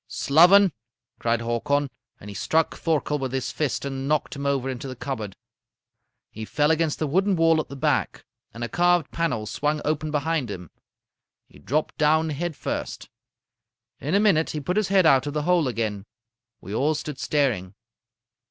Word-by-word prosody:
"'Sloven!' 180 +6 +5 0.5
cried 115 0 0
Hakon, 120 +5 0 0.3
and 100 - -12
he 105 - -7
struck 160 +10 0
Thorkel 150 -2 -1
with 130 -2 -3
his 130 -1 -2
fist 145 -3 -2
and 135 0 -4
knocked 150 -1 0
him 140 0 -3
over 135 -2 0
into 130 0 -5
the 130 - -6
cupboard. 110 -7 -5 1.0
"He 110 - -7
fell 145 +7 +1
against 160 -1 +1
the 155 - -1
wooden 190 +7 +1
wall 165 -1 +4
at 135 - -11
the 140 - -7
back, 135 - -1 0.3
and 115 - -7
a - - -1
carved 175 +3 +2
panel 165 -10 -1
swung 150 +7 -1
open 155 +1 -1
behind 150 -3 -1
him. 90 -5 -8 0.7
He - - -19
dropped 150 - -2
down 155 +1 +3
head 165 +2 -3
first. - - -5 0.9
In 150 +7 -1
a - - +5
minute 195 -7 +3
he 155 - -3
put 165 +6 -2
his 215 -3 +2
head 190 -2 +3
out 135 -3 +4
of 145 - -3
the 150 - 0
hole 175 -3 +2
again. 110 -4 -3 0.5
We 100 - -8
all 145 +7 +1
stood 150 -1 -6
staring. 115 -11 0
145 Hz, 180 wpm, -24 LUFS, 125-160 Hz, 1.0 s, Sloven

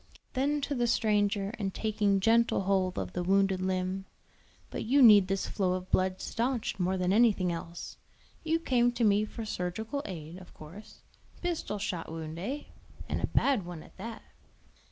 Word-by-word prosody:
Then 285 +3 +1
to 285 - -2
the 240 -3 +1
stranger, 205 -2 +1
and 195 -2 -3
taking 205 -2 +1
gentle 230 +1 +3
hold 190 -1 +1
of - - -3
the 180 - -2
wounded 195 +1 +2
limb: 185 +1 -1 0.7
"But - - -4
you 265 +6 +3
need 205 -5 +8
this 195 0 -1
flow 185 -3 0
of 185 0 -5
blood 185 0 +1
stanched 235 -3 -2
more 185 +1 +1
than 180 +1 +1
anything 205 -5 +4
else. 170 0 -7 0.5
You 325 0 +2
came 245 -7 +2
to 240 -1 -1
me 210 0 +4
for 220 +1 -7
surgical 220 +8 -3
aid, 170 -2 -7
of 185 - -15
course. 170 +8 -12 0.4
Pistol 340 -11 -2
shot 180 -5 -4
wound, 160 0 -6
eh? 265 +11 -4 0.4
and - - -2
a - - 0
bad 270 -8 +2
one 175 -2 -8
at - - -18
that." 225 +3 -7
200 Hz, 175 wpm, -30 LUFS, 185-230 Hz, 0.7 s, need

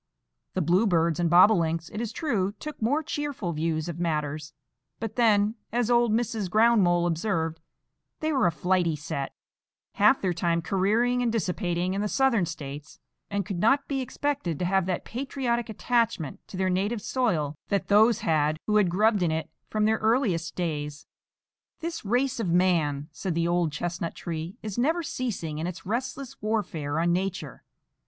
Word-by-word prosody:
The 185 - +1
bluebirds 170 -2 +2
and 170 -1 +2
bobolinks, 170 -2 +4
it 210 - -3
is 230 -2 -3
true, 220 - -1
took 300 +4 -8
more 285 +8 +1
cheerful 290 - -3
views 160 0 -1
of 170 -1 -5
matters; 155 -2 -2 0.5
but 220 -1 -4
then, 215 -3 +3 0.2
as 240 +1 +1
old 240 -1 +4
Mrs. 220 -3 -1
Ground 225 +2 +5
mole 175 -1 +3
observed, 165 -2 -1 0.6
they 310 0 0
were 265 -9 +3
a - - +2
flighty 175 0 +1
set,—half 160 - -2
their 185 -2 0
time 170 0 0
careering 220 +7 +2
and 240 -2 +1
dissipating 180 -3 -1
in 200 - -1
the 210 - 0
Southern 235 -6 +2
States,—and 150 +6 -7
could 195 -4 -4
not 270 +8 +3
be 270 -2 -1
expected 260 - -2
to 180 - -2
have 190 0 +1
that 185 - -2
patriotic 245 -2 -2
attachment 225 - 0
to 185 - -8
their 185 0 +1
native 205 +4 -1
soil 165 - 0
that 200 -1 -1
those 220 +3 +5
had 155 -1 +1
who 215 0 +2
had 200 -4 +4
grubbed 210 +3 +3
in 175 - +2
it 160 0 -3 0.2
from 215 -1 +1
their 220 +1 +2
earliest 215 -8 +1
days. 150 -4 -3 0.7
"This 330 0 -4
race 245 +5 0
of 195 - -1
man," 165 -5 +2
said 175 +2 -4
the 170 0 +1
old 175 -2 +1
chestnut 170 +2 -3
tree, 165 +1 -5
"is 215 +1 -4
never 320 +7 +1
ceasing 190 - -3
in 165 - -2
its 180 +1 -7
restless 255 +5 -4
warfare 175 -9 -1
on 170 +1 +2
Nature. 180 - -3
190 Hz, 165 wpm, -27 LUFS, 165-230 Hz, 0.7 s, Ground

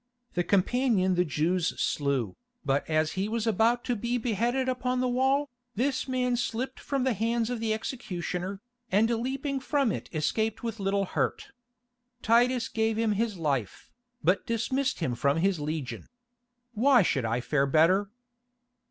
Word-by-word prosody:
The 175 - +1
companion 200 +1 +2
the 180 0 +3
Jews 165 +3 0
slew, 140 -8 0 0.3
but 140 +2 0
as 155 0 +2
he 195 +2 -2
was 230 0 -1
about 225 +3 +2
to 245 - -1
be 235 +3 -1
beheaded 240 +3 0
upon 250 0 -1
the 255 - +1
wall, 265 +3 +2 0.3
this 260 +5 0
man 250 -1 0
slipped 245 +2 -3
from 275 -2 -2
the 260 -1 +2
hands 230 +2 0
of 245 - -2
the 225 -1 -1
executioner, 195 -4 -4 0.3
and 210 +4 +4
leaping 270 +4 -2
from 275 -3 +1
it - - -5
escaped 220 +9 -1
with 225 -2 -4
little 195 0 0
hurt. - - -2 0.7
Titus 240 +1 +3
gave 220 0 0
him 225 -1 +1
his 210 -1 -1
life, 140 - -2 0.3
but 185 +2 +2
dismissed 260 +2 -1
him 130 -6 0
from 140 +5 +1
his 185 0 +1
legion. 145 -6 -4 0.7
Why 245 +1 +5
should 135 -6 0
I 115 +2 0
fare 140 +2 +1
better?" 170 +8 +3
220 Hz, 155 wpm, -28 LUFS, 175-245 Hz, 0.7 s, Why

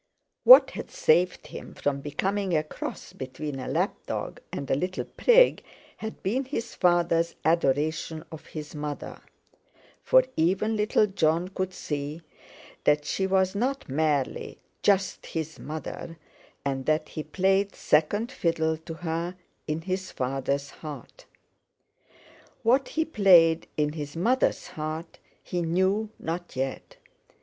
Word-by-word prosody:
What - - +10
had - - -7
saved 175 +3 +2
him - - -9
from 140 -1 -1
becoming 185 +5 -1
a 155 - +1
cross 155 - -7
between 135 +2 -6
a 130 - -5
lap - - +1
dog - - -4
and 140 - -4
a - - +1
little 180 +7 -1
prig, - - +4 0.3
had 220 0 -7
been 250 +8 0
his 235 -3 -4
father's 170 -2 +2
adoration 155 0 +1
of 160 -1 -10
his 150 -2 -7
mother, 150 -1 -5 0.8
for - - +5
even 190 +7 +1
little 210 0 +3
Jon 175 -3 +1
could 190 -1 -3
see 150 -2 -5 0.6
that 150 0 +3
she 190 - 0
was 190 -1 +2
not 260 +7 -1
merely 145 -1 -1 0.2
just 195 -2 +2
his 160 -1 -4
mother, 160 +2 -6 0.5
and 135 -1 -2
that 155 0 +1
he 155 - -5
played 195 +4 +1
second 205 - +2
fiddle 160 -4 0
to 160 +1 -8
her 170 +2 -3 0.3
in 155 +1 -2
his 185 +2 -3
father's 135 +2 -2
heart: 150 -5 -10 1.4
What 255 +4 +3
he 320 0 -1
played 175 - +5
in 150 -1 +1
his 145 -1 -6
mother's 240 +10 +1
heart 155 +2 -5 0.2
he 175 - -2
knew 190 +6 +1
not 170 0 -5
yet. 135 +1 -4
165 Hz, 135 wpm, -27 LUFS, 150-190 Hz, 1.4 s, What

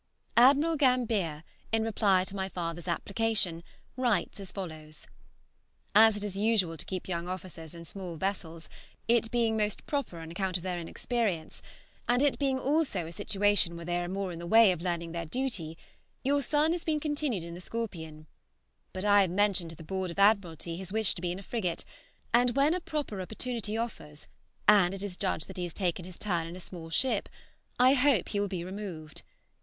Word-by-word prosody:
Admiral 285 +7 +6
Gambier, 225 - +2 0.3
in 225 0 +2
reply 205 -4 +3
to 190 +1 -7
my 190 -1 -2
father's 170 -1 -4
application, 195 -1 0 0.3
writes 245 -4 0
as 195 -2 -5
follows: 155 -5 -7 0.9
"As 220 0 +7
it 205 - -4
is 205 -2 -4
usual 200 -5 +2
to - - -7
keep 185 -2 -4
young 170 -1 -2
officers 175 -3 -7
in 170 0 -9
small 180 -1 -7
vessels, 165 -2 -3 0.4
it 230 -1 +3
being 230 -1 +1
most 210 -1 -1
proper 280 - -2
on 165 0 -8
account 185 +1 -1
of 175 - -10
their 180 -2 -2
inexperience, 180 -1 -2 0.5
and 245 +3 +4
it 285 - +2
being 270 -2 +1
also 270 - +1
a 165 - -7
situation 200 0 +2
where 170 0 -7
they 175 0 0
are 175 - -2
more 190 0 -2
in 165 - -7
the 170 - -6
way 225 +1 +7
of 175 -2 -3
learning 170 -2 -2
their 170 -1 -4
duty, 185 -8 -2 0.5
your 285 +2 +2
son 300 +4 +2
has 345 0 -1
been 310 -2 +1
continued 295 - -1
in 170 0 -7
the 175 - -8
'Scorpion;' 165 -9 -5 0.7
but 185 +2 -3
I 205 0 +6
have 190 - +2
mentioned 195 -2 +1
to 165 - -9
the 165 - -11
Board 190 +2 -3
of 170 - -7
Admiralty 185 -5 +2
his 190 0 -6
wish 220 -1 +2
to 170 - -8
be 175 -1 -1
in 180 - -4
a 195 - -9
frigate, 185 -6 -2 0.5
and 240 0 +4
when 280 +3 +4
a 365 - 0
proper 295 - -3
opportunity 220 +2 -3
offers 150 -10 -5 0.4
and 195 -3 +6
it 195 - -7
is 200 -3 -4
judged 185 -4 -1
that - - -9
he 180 - -2
has 170 - -7
taken 180 -2 -1
his 185 -1 -10
turn 175 -5 -1
in 170 - -8
a - - -8
small 170 -2 -9
ship, 225 +5 +1 0.5
I 255 +2 +6
hope 260 -7 +3
he 205 - -1
will 205 - +1
be 180 -3 -4
removed. 180 -5 -7
195 Hz, 200 wpm, -30 LUFS, 170-230 Hz, 0.9 s, As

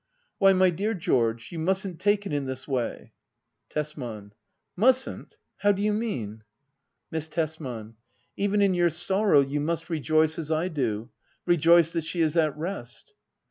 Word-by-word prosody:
Why, 195 0 +6
my 185 -1 +4
dear 205 +6 -1
George, 115 - 0
you 170 - -5
mustn't 190 +1 -1
take 205 0 +1
it 175 - -4
in 140 -2 -1
this 130 0 -5
way. 130 -4 -3 0.6
Tesman. 120 -9 -5 0.4
Mustn't 255 +6 +1
} - - -53
How 205 - +4
do 200 0 -2
you 210 0 +2
mean 125 - -3 0.3
} 135 - -54
Miss 160 -1 -3
Tesman. 135 -9 -4 0.4
Even 205 0 +1
in 195 -2 +3
your 175 -1 +3
sorrow 190 0 +3
you 140 +2 -2
must 165 +2 -3
rejoice, 155 0 +1
as 160 -1 -4
I 160 +3 0
do 120 - -2 0.2
— - - -40
rejoice 170 -1 +4
that 165 - -1
she 165 +2 -2
is 160 0 +1
at 155 -3 +2
rest. 155 -8 -6
160 Hz, 170 wpm, -26 LUFS, 140-185 Hz, 0.6 s, Why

